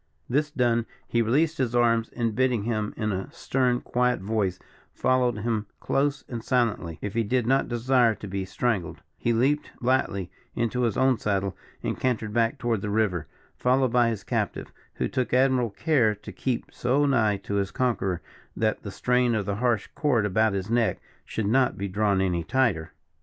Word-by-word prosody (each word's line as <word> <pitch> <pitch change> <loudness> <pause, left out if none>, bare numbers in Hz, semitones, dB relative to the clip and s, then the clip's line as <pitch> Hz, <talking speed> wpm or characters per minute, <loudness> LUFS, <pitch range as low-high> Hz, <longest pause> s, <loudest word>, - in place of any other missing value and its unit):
This 150 +4 +1
done, 120 -5 +1 0.2
he 120 - +1
released 150 +8 +1
his 120 -2 0
arms, 115 -1 +3
and 115 -2 -2
bidding 125 -3 +1
him 110 -2 -1
in 110 -1 -1
a 95 +7 -4
stern, 130 -6 0
quiet 125 0 +1
voice 100 -2 -1 0.4
followed 125 -3 +2
him 110 -1 -1
close 140 0 0
and 115 -3 -5
silently, 115 -11 0
if 105 - -3
he 115 - +1
did 125 +2 0
not 135 +3 +2
desire 120 -1 +3
to 105 - -8
be 95 0 -3
strangled, 95 -1 -2 0.2
he 120 - +1
leaped 135 +6 +1
lightly 120 -7 0 0.2
into 120 +1 0
his 115 -3 +1
own 130 -2 +3
saddle, 100 -2 -1 0.3
and - - -2
cantered 110 -4 -1
back 115 +3 +2
toward 120 -5 -1
the 105 - -3
river, 100 -7 0 0.3
followed 130 -1 +2
by 120 -1 +4
his 110 -4 -4
captive, - - -2 0.2
who - - -1
took 130 -2 -1
admirable 130 -2 +3
care 110 0 +2
to 100 - -10
keep 125 -3 -2
so 135 +4 +1
nigh 110 -7 +2
to 100 +1 -3
his 100 -1 0
conqueror 95 -10 -1 0.3
that - - 0
the - - -6
strain 125 -1 +1
of 105 -2 -1
the 100 0 -2
harsh 120 -3 +1
cord 125 -8 +1
about 110 +2 +2
his 95 0 -2
neck 115 -1 +2 0.3
should 110 - -3
not 125 +4 +2
be 100 - -2
drawn 100 0 +1
any 90 -3 0
tighter. 95 -6 +1
115 Hz, 185 wpm, -26 LUFS, 105-125 Hz, 0.4 s, by